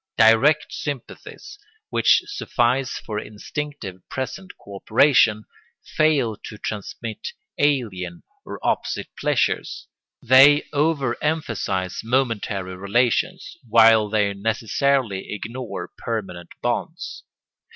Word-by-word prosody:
Direct 115 +7 +4
sympathies, 145 - -7 0.3
which - - +4
suffice 130 - 0
for 105 -1 -5
instinctive 110 -1 -6
present 130 +9 -5
co 100 -1 -10
operation, 110 -1 +4 0.5
fail 145 -8 +2
to 105 - -10
transmit 105 +2 -6 0.3
alien 105 -12 0 0.2
or - - -7
opposite - - -1
pleasures. - - -1 0.3
They 140 +4 +6
over 145 -4 +1
emphasise 105 - -2
momentary 110 -6 -1
relations, 120 - 0
while 110 -2 +5
they 105 -2 +1
necessarily 115 +1 0
ignore 115 +4 -6
permanent 95 -7 -5
bonds. - - -3
115 Hz, 90 wpm, -22 LUFS, 105-140 Hz, 0.5 s, They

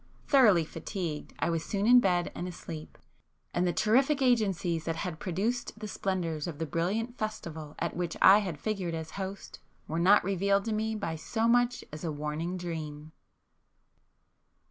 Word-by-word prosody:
Thoroughly 215 - +5
fatigued, 165 -1 -5
I - - 0
was 165 -1 -1
soon 200 0 -1
in 245 +2 +8
bed 180 -6 +1
and 175 - -4
asleep,—and 165 - -7
the - - +2
terrific 255 - +3
agencies 195 - +1
that 165 - -1
had 165 -1 -4
produced 210 +7 -2
the 215 -1 -6
splendours 175 -6 -2
of 165 -4 -5
the 160 - -2
brilliant 200 - -2
festival 165 -8 -5
at 170 - -2
which 175 -2 -3
I 200 +2 +8
had 185 -7 -4
figured 190 -5 -2
as 160 -1 -6
host, 195 0 -6 0.3
were 160 +2 -2
not 195 +4 +6
revealed 195 +1 +1
to 225 - -1
me 220 +1 -1
by 165 -6 -3
so 225 +8 -1
much 245 +1 +3
as 150 - -7
a 165 - -1
warning 150 +4 -3
dream! 155 -3 -6
180 Hz, 165 wpm, -30 LUFS, 165-215 Hz, 0.3 s, in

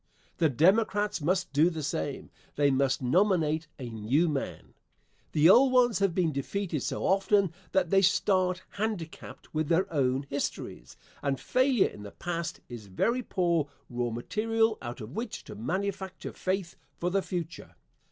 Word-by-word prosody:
The 160 -2 +4
Democrats 205 - +2
must 175 +1 0
do 155 +5 +5
the 160 -3 -5
same. 80 - -3 0.2
They 145 -1 +3
must 135 0 +1
nominate 160 +1 +2
a 130 - -6
new 115 +10 +1
man. 145 -4 -4 0.6
The 155 +1 +5
old 255 +8 +7
ones 245 -5 +4
have 195 -4 +1
been 175 -4 +2
defeated 155 +3 -3
so - - -3
often 195 -2 +3 0.2
that 190 -3 +1
they 195 0 +5
start 185 -1 +2
handicapped 205 -6 -5
with 155 -1 0
their 170 +4 +3
own 135 -1 +1
histories, 140 - -5 0.2
and 140 -2 -1
failure 255 - +2
in - - -12
the 105 - -8
past 170 - -4
is 115 -4 -9
very 230 - 0
poor 170 - 0 0.2
raw 120 0 -1
material 225 - 0
out 120 +1 -6
of 110 +2 -8
which 225 - -5
to - - -10
manufacture 200 -2 -4
faith 185 -1 -2 0.2
for 175 +1 -1
the 195 +1 +2
future. 170 -3 -6
175 Hz, 155 wpm, -29 LUFS, 140-200 Hz, 0.6 s, old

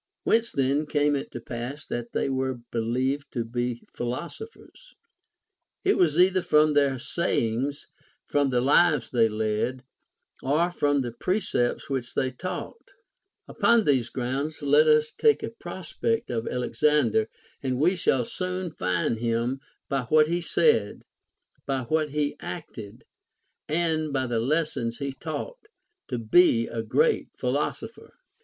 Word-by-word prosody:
\Vhence 230 +1 +3
then 140 +3 +1
came 145 -1 +2
it 140 - -4
to - - -7
pass 120 +5 -6
that 120 0 -5
they - - 0
Avere 130 -2 -2
belicA^ed 125 +5 0
to 120 -3 -2
be 120 0 -3
philosophers 440 - -7 0.9
1 390 - +4
It - - -2
was 170 -2 +3
either 185 +1 +5
from 150 -2 +4
their 140 -2 +3
sayings, 135 -2 -1 0.4
from 145 -1 +1
the 125 -2 +1
lives 145 0 +3
they 115 -3 +3
led, 110 +4 -1 0.6
or 155 +6 +1
from 145 -4 +1
the 120 -2 -3
precepts 125 - -1
which 130 -3 -4
they 130 - 0
taught. 185 - -6 0.7
Upon 235 -1 +3
these 130 - +2
grounds 140 +5 -3
let 145 +2 +5
us 155 0 +4
take 445 -1 +3
a - - -4
prospect 190 - -3
of 115 -1 -2
Alexander, 125 -2 +1 0.3
and 130 -2 -1
we 175 +6 +3
shall 130 -8 +1
soon 185 +2 -3
find 90 - -1
him, 120 +3 -1 0.3
by 135 -3 -1
what 155 +4 +5
he 170 +3 -1
said, 150 -10 +2 0.6
by 135 -2 -1
\vhat 155 +4 0
he 145 0 -1
acted, 115 - -8 0.6
and 155 -1 0
by 135 -1 0
the 120 -2 -1
lessons 130 -3 -1
he 140 -1 -4
taught, 430 - -6 0.4
to 125 - -3
be 115 +1 +4
a 115 - -3
great 460 - +1
philosopher. - - -3
140 Hz, 140 wpm, -26 LUFS, 120-155 Hz, 0.9 s, either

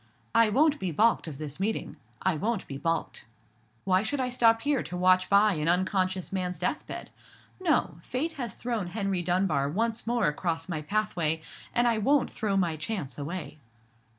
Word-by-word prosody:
I 230 -1 +5
won't 290 +6 +3
be 185 - -2
balked 220 +4 +3
of 150 -4 -6
this 150 +1 -6
meeting—I 185 - -2
won't 210 +5 -1
be 135 - -7
balked. 165 -1 -2 0.6
Why 185 0 +3
should 275 +7 -2
I 255 -1 0
stop 230 -2 +4
here 285 -3 +2
to 180 - -5
watch 185 +1 +4
by 205 +1 +5
an 155 -1 0
unconscious 185 +1 0
man's 180 -2 -2
death 180 - -2
bed? - - -7 0.5
No! 295 - +1
Fate 270 - -2
has 245 -9 -5
thrown 230 -6 -2
Henry 195 -1 -1
Dunbar 175 -5 +1
once 225 +7 -1
more 240 0 +2
across 165 +2 -1
my 165 -4 -3
pathway: 170 -4 0 0.3
and 240 0 +3
I 230 -2 +2
won't 275 +5 +2
throw 200 -3 -1
my 170 -4 +1
chance 150 - -4
away." 155 +1 -5
190 Hz, 175 wpm, -28 LUFS, 165-230 Hz, 0.6 s, I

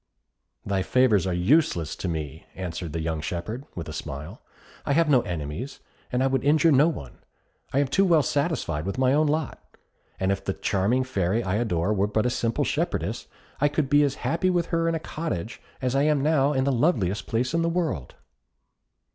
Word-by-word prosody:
"Thy 100 -1 0
favours 110 -3 +3
are - - 0
useless 90 - +2
to - - -4
me," 80 -2 -5
answered 90 -3 -5
the 80 +1 -3
young 80 -1 -2
shepherd, 90 - -4
with 85 -3 -5
a 80 - -6
smile; 70 0 -7 0.4
"I 140 - 0
have 165 +2 +3
no 130 -3 +5
enemies, 85 - -5 0.3
and 125 +1 +1
I - - +3
would 135 -1 +1
injure 155 +3 +4
no 145 +3 +5
one; 70 - -5 0.5
I - - -1
am 140 0 +3
too 165 +9 +2
well 170 -6 +4
satisfied 140 - -1
with 100 - -3
my 130 0 +3
own 155 +1 +3
lot; 150 -1 -2 0.6
and 95 0 +1
if 100 - -2
the - - -2
charming 105 +7 +1
Fairy 110 -3 0
I 95 +1 0
adore 100 -4 0
were 100 0 +1
but 110 +2 0
a 125 - +2
simple 115 -1 0
shepherdess, - - -2 0.3
I 145 - +4
could 145 -1 -1
be 145 0 +6
as 140 -1 +1
happy 185 +3 +1
with 175 -2 0
her 165 0 +1
in 165 - 0
a - - -1
cottage 120 - -5 0.2
as 125 -1 +1
I 135 - +3
am 150 -2 +2
now 145 -2 +3
in 130 -2 +1
the 140 - +1
loveliest 115 - +1
palace 120 +5 -1
in 165 - +2
the 165 - +1
world." 165 - -2
125 Hz, 205 wpm, -25 LUFS, 90-145 Hz, 0.6 s, be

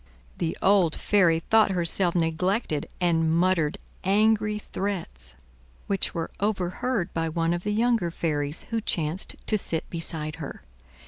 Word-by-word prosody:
The 165 - -1
old 190 -5 +4
fairy 175 -6 +3
thought 220 +4 +4
herself 175 0 +3
neglected, 165 0 0
and 165 -3 +2
muttered 170 -2 +2 0.3
angry 210 +2 +3
threats, 170 - -4 0.5
which 195 -2 -1
were 165 -1 -3
overheard 200 +1 -1
by 165 0 -1
one 165 +1 0
of 175 - -2
the 210 - -1
younger 225 -4 +2
fairies, 150 -2 -2
who 225 -1 0
chanced 165 -2 -2
to 215 - +1
sit 165 -4 -3
beside 160 -2 -5
her. 145 -4 -7
175 Hz, 135 wpm, -26 LUFS, 165-205 Hz, 0.5 s, old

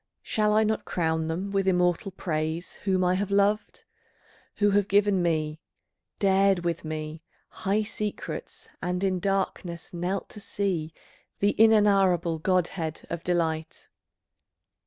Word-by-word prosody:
Shall 210 -1 +1
I 220 - +5
not 215 0 0
crown 160 -2 -1
them 180 +5 -3
with 195 -1 0
immortal 180 +1 +2
praise 160 -2 -3
Whom 190 -2 +2
I 180 0 +3
have 195 +1 -1
loved, 200 +2 +1 0.7
who 205 -1 +3
have 200 -1 +2
given 200 -1 +3
me, 155 -2 -1 0.6
dared 195 -2 +3
with 170 -1 -1
me 155 0 -5 0.3
High 205 +3 -1
secrets, 210 -1 -5
and 180 +1 -2
in 185 -2 +1
darkness 185 -3 -2
knelt 180 +3 -2
to - - -10
see 185 -6 -2 0.5
The 205 +1 +2
inenarrable 195 -6 +4
godhead 175 -2 -1
of 170 -1 -4
delight? 160 -3 -2
185 Hz, 130 wpm, -27 LUFS, 165-200 Hz, 0.7 s, I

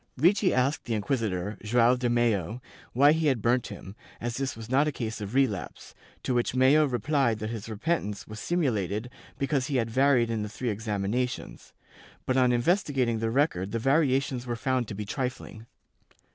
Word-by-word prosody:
Ricci 185 +7 +3
asked 130 +3 0
the 115 - -1
inquisitor, 105 -3 -2
Joao 120 +3 +4
de 125 -1 -1
Mello, 115 -3 +1 0.3
why 140 +4 +6
he 160 0 +1
had 130 -5 +2
burnt 120 +3 +1
him, 95 +2 -9 0.2
as 120 0 -3
this 135 -3 -3
was 110 -1 -8
not 135 +5 +2
a - - +1
case 110 -5 -5
of 105 +4 -5
relapse, 130 -9 -1 0.3
to 130 - -1
which 120 +1 0
Mello 135 +4 +5
replied 130 -1 +1
that 110 +1 -4
his 115 -1 -6
repentance 110 -3 -2
was 110 0 -8
simulated 115 - -1 0.3
because 135 -1 0
he 145 - -2
had 115 -2 0
varied 130 -2 +3
in 110 -2 -1
the 105 - -4
three 120 +2 -3
examinations, 105 +3 -3 0.5
but 130 - 0
on 125 -1 +4
investigating 125 - +1
the 115 0 -1
record 115 - 0
the - - +1
variations 135 -1 +1
were 120 - -2
found 130 0 -1
to 105 - -6
be 105 +1 -5
trifling. 125 -1 -5
120 Hz, 180 wpm, -27 LUFS, 110-135 Hz, 0.5 s, why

